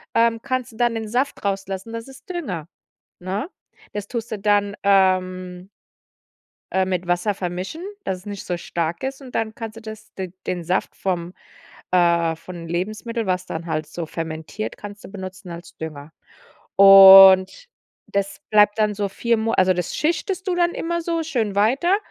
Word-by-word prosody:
ähm, 230 0 +3
kannst 255 -3 -3
du 220 - -16
dann 240 -1 +1
den 220 -1 -4
Saft 255 +4 -1
rauslassen. 195 +2 -3
Das 230 +2 -6
ist 270 +9 -15
Dünger, 205 - -4 0.5
ne? 195 - -3 0.4
Das 205 -1 -5
tust 235 -2 -5
du 210 - -3
dann, 205 0 +1
ähm 185 -1 +1 1.0
äh, 190 0 +2
mit 185 -1 -2
Wasser 175 +4 +1
vermischen, 185 - -5 0.2
dass 185 -1 -3
es 185 - -20
nicht 205 -2 -7
so 175 - -2
stark 170 +4 -3
ist, 270 +1 -4
und 255 -2 -12
dann 220 -1 -2
kannst 225 -1 -7
du - - -10
das 220 0 -10
d 185 -2 -6
den 175 -2 -3
Saft 180 +3 -1
vom 180 -2 -3 0.6
äh, 170 -2 +3
vom 170 0 -10
Lebensmittel, 215 +6 -3
was 185 0 -1
dann 165 +1 -6
halt 155 -2 -2
so 165 +1 -5
fermentiert, 160 +6 -5
kannst 205 0 -10
du - - -9
benutzen 190 -1 -8
als 170 0 -10
Dünger. 155 -1 -8 0.7
Und 195 - +9 0.4
das 200 +2 -3
bleibt 210 0 +4
dann 210 -1 +2
so 200 0 -2
4 235 +4 0
Mona 225 +1 -1
also, 185 0 +4
das 180 -1 -3
schichtest 370 +4 -1
du 370 - 0
dann 345 0 +2
immer 340 +1 -2
so 335 -1 -1
schön 225 -10 -2
weiter, 270 - +3
195 Hz, 175 wpm, -22 LUFS, 180-230 Hz, 1.0 s, Und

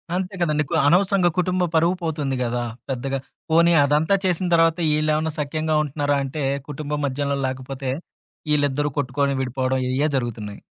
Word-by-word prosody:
అంతే 185 +2 -2
కదండీ! 150 -3 +2
కు - - -4
అనవసరంగా 185 +1 +4
కుటుంబ 185 0 +1
పరువు 170 +3 +3
పోతుంది 150 -5 -1
గదా! 120 0 -1 0.3
పెద్దగా. 135 +1 -2 0.3
పోనీ 170 +1 +5
అదంతా 150 +6 +3
చేసిన 180 0 +1
తరువాత 165 +1 +3
ఈళ్ళేమన్నా 155 +1 +1
సఖ్యంగా 155 +2 -1
ఉంటున్నారా 145 0 0
అంటే 140 +2 -4 0.3
కుటుంబం 150 +1 -3
మధ్యలో 140 +1 -1
లేకపోతే 130 0 -4 0.6
,ఈళ్ళిద్దరు 145 0 +1
కొట్టుకొని 140 +1 0
విడిపోవడం 130 0 -1
ఇయే 140 +4 +1
జరుగుతున్నాయి. 110 -5 -5
145 Hz, 140 wpm, -23 LUFS, 135-160 Hz, 0.6 s, పోనీ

